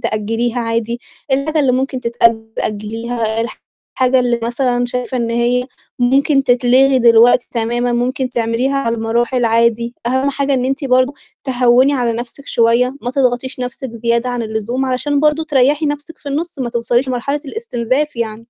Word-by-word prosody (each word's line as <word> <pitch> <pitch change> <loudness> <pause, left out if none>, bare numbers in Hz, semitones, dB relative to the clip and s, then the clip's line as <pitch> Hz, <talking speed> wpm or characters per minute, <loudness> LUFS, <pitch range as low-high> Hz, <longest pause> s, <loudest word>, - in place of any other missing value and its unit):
تأجّليها 225 +1 -1
عادي، 230 +1 -2 0.3
الحاجة 305 +4 +1
اللي 265 -3 +2
ممكن 260 +1 -1
تتأجّل 230 -2 +1
أجّليها، 225 +1 -3 0.6
الحاجة 255 0 +3
اللي 245 -1 +1
مثلًا 245 +1 0
شايفة 250 +1 -3
إن 235 -2 -1
هي 240 +1 +1 0.3
ممكن 275 +3 +3
تتلغي 255 +2 +4
دلوقتي 235 +1 +5
تمامًا 240 +1 -1
ممكن 255 +2 -1
تعمليها 235 +3 0
على 230 -4 0
المراحل 235 +2 0
عادي، 235 +1 +1
أهَم 260 +3 +1
حاجة 280 0 0
إن 250 - 0
أنتِ 270 +3 -2
برضه 255 +1 +2 0.3
تهوّني 255 +1 +3
على 245 -4 0
نَفْسِك 240 +4 -7
شويّة، 240 +3 +2
ما 245 - -3
تضغطيش 255 -1 -1
نَفْسِك 250 0 -5
زيادة 235 +1 0
عن 245 -1 -2
اللزوم 220 +4 -2
علشان 280 +3 0
برضه 305 +1 +2
تريّحي 290 +1 +2
نَفْسِك 295 +2 -5
في 290 - -8
النُص 325 +4 -3
ما 245 -3 -2
توصليش 240 +2 0
لمرحلة 270 +4 -2
الإستنزاف 280 - -2
يعني. 225 -2 -2
245 Hz, 155 wpm, -17 LUFS, 235-270 Hz, 0.6 s, دلوقتي